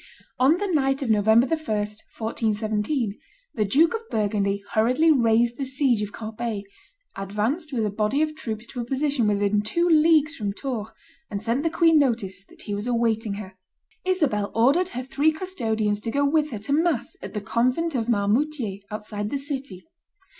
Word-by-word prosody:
On 275 Hz, +6 st, +5 dB
the 410 Hz, -, -2 dB
night 275 Hz, -6 st, +1 dB
of 235 Hz, -, +1 dB
November 220 Hz, +3 st, +5 dB
1, 325 Hz, +4 st, 0 dB
1417, 215 Hz, 0 st, -2 dB, 0.3 s
the 220 Hz, -, +1 dB
Duke 310 Hz, -, +4 dB
of 455 Hz, 0 st, -5 dB
Burgundy 200 Hz, -2 st, 0 dB
hurriedly 255 Hz, +9 st, +3 dB
raised 235 Hz, -3 st, +3 dB
the 275 Hz, -, -2 dB
siege 265 Hz, -4 st, +1 dB
of 210 Hz, -1 st, -3 dB
Corbeil, 220 Hz, -1 st, -4 dB, 0.5 s
advanced 215 Hz, -, -2 dB
with 230 Hz, -5 st, 0 dB
a 210 Hz, -, -1 dB
body 215 Hz, +8 st, +1 dB
of 310 Hz, 0 st, -2 dB
troops 220 Hz, -5 st, -5 dB
to 245 Hz, +2 st, -8 dB
a -, -, -3 dB
position 270 Hz, -1 st, 0 dB
within 205 Hz, 0 st, +2 dB
two 340 Hz, +12 st, 0 dB
leagues 315 Hz, -2 st, +4 dB
from 205 Hz, -9 st, -3 dB
Tours, 235 Hz, -3 st, -4 dB, 0.4 s
and 200 Hz, -, -3 dB
sent 230 Hz, +5 st, -1 dB
the 330 Hz, -, +1 dB
queen 330 Hz, -1 st, +4 dB
notice 225 Hz, -8 st, 0 dB
that -, -, -13 dB
he 205 Hz, -, -4 dB
was 205 Hz, +3 st, -3 dB
awaiting 225 Hz, -3 st, 0 dB
her. 190 Hz, -2 st, -8 dB, 0.5 s
Isabel 295 Hz, -, 0 dB
ordered 275 Hz, +11 st, +4 dB
her 255 Hz, -8 st, -5 dB
three 285 Hz, +4 st, +2 dB
custodians 225 Hz, -, -1 dB
to 225 Hz, -, -4 dB
go 285 Hz, +5 st, +1 dB
with 300 Hz, +1 st, +2 dB
her 230 Hz, -, -5 dB
to 215 Hz, +7 st, -2 dB
mass 310 Hz, -5 st, +1 dB
at -, -, -8 dB
the -, -, 0 dB
Convent 255 Hz, +10 st, 0 dB
of 240 Hz, -3 st, -1 dB
Marmoutier, 225 Hz, 0 st, 0 dB
outside 210 Hz, 0 st, -5 dB
the 280 Hz, -, -1 dB
city. 275 Hz, -, -6 dB
235 Hz, 175 wpm, -24 LUFS, 210-290 Hz, 0.5 s, On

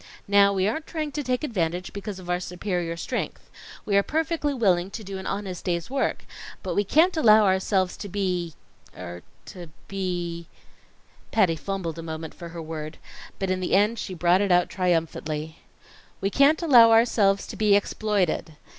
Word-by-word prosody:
Now, 200 Hz, 0 st, +5 dB
we 190 Hz, -1 st, +1 dB
aren't 305 Hz, +9 st, -3 dB
trying 310 Hz, -3 st, -3 dB
to 295 Hz, -, -3 dB
take 255 Hz, 0 st, -1 dB
advantage 180 Hz, -, -2 dB
because 200 Hz, -1 st, -6 dB
of 185 Hz, -2 st, -11 dB
our 180 Hz, 0 st, 0 dB
superior 180 Hz, -2 st, -3 dB
strength. -, -, -5 dB, 0.3 s
We 200 Hz, -, 0 dB
are -, -, +6 dB
perfectly 315 Hz, +3 st, -1 dB
willing 190 Hz, -8 st, +1 dB
to 220 Hz, +2 st, -7 dB
do 195 Hz, -1 st, -6 dB
an 190 Hz, -, -7 dB
honest 195 Hz, -3 st, -4 dB
day's 170 Hz, +4 st, -2 dB
work, 275 Hz, 0 st, -1 dB, 0.4 s
but -, -, -3 dB
we 205 Hz, -, +2 dB
can't 325 Hz, -, +3 dB
allow 220 Hz, -8 st, +6 dB
ourselves 190 Hz, -1 st, +1 dB
to 205 Hz, -, -7 dB
be 180 Hz, -5 st, -2 dB, 0.4 s
er 90 Hz, -1 st, -8 dB, 0.2 s
to 180 Hz, -4 st, -10 dB, 0.2 s
be 175 Hz, -3 st, -4 dB, 0.4 s
" -, -, -33 dB
Patty 190 Hz, -7 st, +3 dB
fumbled 170 Hz, -1 st, -4 dB
a -, -, -4 dB
moment 160 Hz, -1 st, -6 dB
for 170 Hz, -, -9 dB
her 170 Hz, 0 st, -7 dB
word, 155 Hz, 0 st, -6 dB, 0.4 s
but 195 Hz, -1 st, -2 dB
in 185 Hz, -, 0 dB
the 185 Hz, -, 0 dB
end 210 Hz, +3 st, +2 dB
she 185 Hz, -, -5 dB
brought 175 Hz, +2 st, +3 dB
it 200 Hz, -2 st, +1 dB
out 175 Hz, 0 st, +4 dB
triumphantly. 160 Hz, -3 st, -2 dB, 0.6 s
"We 195 Hz, -, -1 dB
can't 290 Hz, -, +4 dB
allow 245 Hz, -8 st, +8 dB
ourselves 220 Hz, -3 st, +3 dB
to -, -, -8 dB
be 210 Hz, -2 st, +4 dB
exploited. 200 Hz, -6 st, 0 dB
190 Hz, 180 wpm, -25 LUFS, 175-215 Hz, 0.6 s, allow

